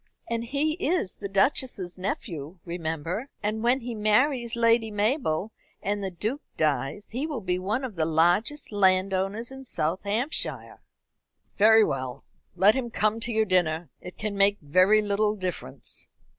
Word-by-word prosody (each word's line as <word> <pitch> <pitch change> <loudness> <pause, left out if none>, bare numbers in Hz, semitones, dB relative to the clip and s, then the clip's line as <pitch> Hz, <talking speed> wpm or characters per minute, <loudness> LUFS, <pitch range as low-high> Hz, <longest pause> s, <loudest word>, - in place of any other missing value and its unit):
And 230 0 -2
he 285 +5 0
is 325 - 0
the 200 - -6
Duchess's 195 -2 +1
nephew, 170 -3 -5
remember; 170 - -3 0.2
and 215 +1 -1
when 245 +3 +2
he 240 0 -5
marries 235 +3 +2
Lady 230 -1 +3
Mabel, 210 - 0 0.3
and 205 +1 -2
the 190 - -1
Duke 220 - -3 0.2
dies, 150 +4 -1
he 260 +7 -2
will 295 -6 -3
be 180 -3 -1
one 210 +8 -1
of 230 -8 -6
the 160 - +2
largest 175 - +1
landowners 195 +3 +1
in 265 0 -9
South 170 -7 -1
Hampshire." 225 +9 -2 0.8
"Very 220 +1 +7
well, 130 -7 -3 0.3
let 195 +4 +6
him 250 -1 -2
come 215 0 +1
to 235 +1 -2
your 220 -1 +2
dinner. 175 -4 +1
It 180 - -10
can 210 -1 -3
make 200 +1 +4
very 185 +8 +4
little 210 +1 +1
difference." 180 - -5
205 Hz, 155 wpm, -26 LUFS, 180-230 Hz, 0.8 s, Very